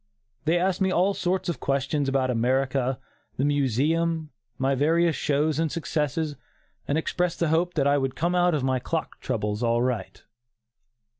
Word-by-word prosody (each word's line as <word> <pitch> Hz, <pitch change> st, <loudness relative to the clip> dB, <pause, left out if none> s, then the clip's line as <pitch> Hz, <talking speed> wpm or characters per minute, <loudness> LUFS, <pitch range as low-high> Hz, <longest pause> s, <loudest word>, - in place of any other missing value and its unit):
They 165 Hz, +3 st, +3 dB
asked 185 Hz, +2 st, 0 dB
me 190 Hz, -, +3 dB
all 185 Hz, +3 st, +2 dB
sorts 185 Hz, 0 st, -1 dB
of 170 Hz, -7 st, -2 dB
questions 140 Hz, +1 st, 0 dB
about 135 Hz, -1 st, +1 dB
America, 130 Hz, +2 st, +1 dB, 0.4 s
the 135 Hz, -, +1 dB
Museum, 150 Hz, +4 st, +1 dB, 0.3 s
my 135 Hz, +1 st, +1 dB
various 160 Hz, +4 st, +2 dB
shows 150 Hz, +1 st, 0 dB
and 160 Hz, -2 st, 0 dB
successes, 155 Hz, -2 st, -2 dB, 0.5 s
and 145 Hz, -, +1 dB
expressed 175 Hz, +2 st, -1 dB
the 170 Hz, -, +1 dB
hope 170 Hz, +3 st, +1 dB
that 140 Hz, -4 st, +2 dB
I 140 Hz, 0 st, +3 dB
would 135 Hz, -1 st, -2 dB
come 170 Hz, +2 st, 0 dB
out 175 Hz, -2 st, +3 dB
of 145 Hz, -, -1 dB
my 130 Hz, -1 st, +1 dB
clock 160 Hz, +6 st, -4 dB
troubles 105 Hz, -3 st, -2 dB
all 120 Hz, 0 st, +2 dB
right. 125 Hz, -2 st, -3 dB
145 Hz, 165 wpm, -26 LUFS, 130-165 Hz, 0.5 s, They